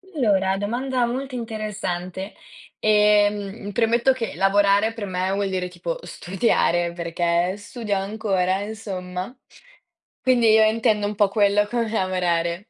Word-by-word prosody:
Allora, 195 Hz, -7 st, +2 dB
domanda 245 Hz, +5 st, -1 dB
molto 260 Hz, +2 st, -4 dB
interessante. 205 Hz, -5 st, -4 dB, 0.5 s
Ehm, 210 Hz, -1 st, +2 dB
premetto 235 Hz, +4 st, +3 dB
che 235 Hz, -3 st, -4 dB
lavorare, 200 Hz, +2 st, +3 dB
per 225 Hz, -3 st, -5 dB
me 185 Hz, 0 st, -2 dB
vuol 200 Hz, 0 st, -1 dB
dire 185 Hz, -1 st, -2 dB
tipo 175 Hz, -2 st, -5 dB
studiare, 175 Hz, -2 st, 0 dB
perché 170 Hz, +1 st, 0 dB
studio 210 Hz, 0 st, -4 dB
ancora, 195 Hz, -2 st, -1 dB
insomma. 195 Hz, -1 st, -6 dB, 0.9 s
Quindi 240 Hz, -3 st, +4 dB
io 220 Hz, -, +6 dB
intendo 215 Hz, -1 st, +1 dB
un 210 Hz, -, -4 dB
po' 205 Hz, 0 st, +4 dB
quello, 205 Hz, 0 st, +2 dB
come 230 Hz, 0 st, -1 dB
lavorare. 180 Hz, -1 st, -1 dB
205 Hz, 125 wpm, -23 LUFS, 185-220 Hz, 0.9 s, io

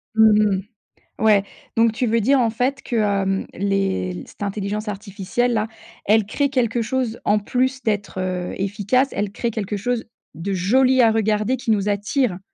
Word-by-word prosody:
Mmh 215 Hz, -1 st, +6 dB
mh. 190 Hz, -, -1 dB, 0.6 s
Ouais, 210 Hz, -3 st, +4 dB, 0.3 s
donc 230 Hz, 0 st, +4 dB
tu 245 Hz, +3 st, -1 dB
veux 230 Hz, +1 st, +2 dB
dire 270 Hz, +4 st, +4 dB
en 235 Hz, -, +3 dB
fait 255 Hz, +4 st, -1 dB
que, 240 Hz, -, -3 dB
hem, 195 Hz, -2 st, +1 dB
les 95 Hz, -, -1 dB
cette -, -, -13 dB
intelligence 205 Hz, +1 st, -3 dB
artificielle-là, 210 Hz, +3 st, -1 dB, 0.4 s
elle 215 Hz, 0 st, +4 dB
crée 280 Hz, +7 st, 0 dB
quelque 240 Hz, -3 st, 0 dB
chose 235 Hz, 0 st, -2 dB
en 210 Hz, -, +4 dB
plus 260 Hz, +5 st, -1 dB
d'être, 205 Hz, -3 st, -2 dB
heu, 180 Hz, -1 st, -3 dB
efficace, 205 Hz, +7 st, +1 dB
elle 205 Hz, 0 st, -2 dB
crée 235 Hz, +2 st, -2 dB
quelque 210 Hz, -2 st, -3 dB
chose 235 Hz, +3 st, -2 dB, 0.3 s
de 170 Hz, +5 st, -4 dB
joli 255 Hz, +8 st, +3 dB
à 225 Hz, -, +6 dB
regarder 215 Hz, +2 st, +1 dB
qui 245 Hz, -, -3 dB
nous 205 Hz, -1 st, +1 dB
attire? 205 Hz, 0 st, 0 dB
215 Hz, 170 wpm, -21 LUFS, 200-240 Hz, 0.6 s, Mmh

